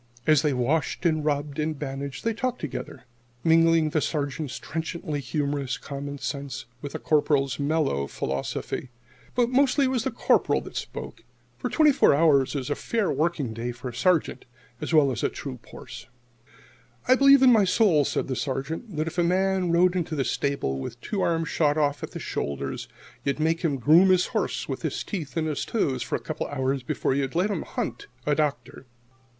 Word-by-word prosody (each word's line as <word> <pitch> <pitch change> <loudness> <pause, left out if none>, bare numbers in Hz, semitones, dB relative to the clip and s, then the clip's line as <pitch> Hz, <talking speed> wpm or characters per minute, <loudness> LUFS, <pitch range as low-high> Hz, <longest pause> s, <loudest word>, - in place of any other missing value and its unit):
As 155 -3 +5
they 150 - +1
washed 140 +7 0
and 155 -2 +2
rubbed 145 0 -1
and 155 0 -1
bandaged, 135 -2 -5
they 230 - +2
talked 250 +2 -2
together, 130 -5 -6 0.4
mingling 165 -1 +4
the 155 - +1
Sergeant's 145 -2 -2
trenchantly 160 -1 -4
humorous 140 0 -2
common 140 0 -6
sense 140 -2 -5 0.2
with 145 - -6
the - - -2
Corporal's 145 -3 +1
mellow 140 - 0
philosophy. 70 - -4 0.5
But 245 -1 +2
mostly 275 +1 +3
it - - +1
was 250 -3 0
the 265 - 0
Corporal - - +2
that - - -11
spoke, - - -6 0.4
for - - -2
twenty 310 -2 +5
four 265 - +4
hours 145 -3 +3
is 140 0 -3
a - - +1
fair 225 -4 -1
working 145 -4 -1
day 115 +2 -3
for 125 +1 -7
a - - -9
Sergeant 150 +1 +1 0.4
as - - -3
well 150 -4 +5
as 120 - -3
a - - +1
Troop 65 - -7
horse. - - -10 1.0
"I 255 - +7
believe 275 +1 +6
in 255 - +8
my 215 -4 +5
soul," 185 -6 +4
said - - -1
the 130 - -2
Sergeant, 145 - -4
"that 155 - 0
if 165 +2 -4
a - - +4
man 185 0 +1
rode 175 +2 +4
into 165 -3 -1
this 135 -3 0
stable 140 - -1
with 65 - -5
his 120 - -13
two 200 -3 -1
arms 165 -1 0
shot 150 -2 +2
off 145 -1 +1
at - - -5
the - - -7
shoulder, 70 -1 -3 0.5
you'd 140 +1 -1
make 160 +1 +1
him 150 -5 0
groom 160 +9 +6
his 185 -1 +4
horse - - -1
with - - -4
his - - -2
teeth 160 - -5
and 160 - +1
his 150 -2 -2
toes 135 - -1
for - - -2
a - - -2
couple - - -4
of 145 - -6
hours 130 +1 0
before 125 - -1
you'd 135 +1 -1
let 185 +5 +2
him - - -2
hunt 410 - -4 0.2
a 150 - +2
doctor." 145 -3 -2
150 Hz, 200 wpm, -26 LUFS, 135-175 Hz, 1.0 s, in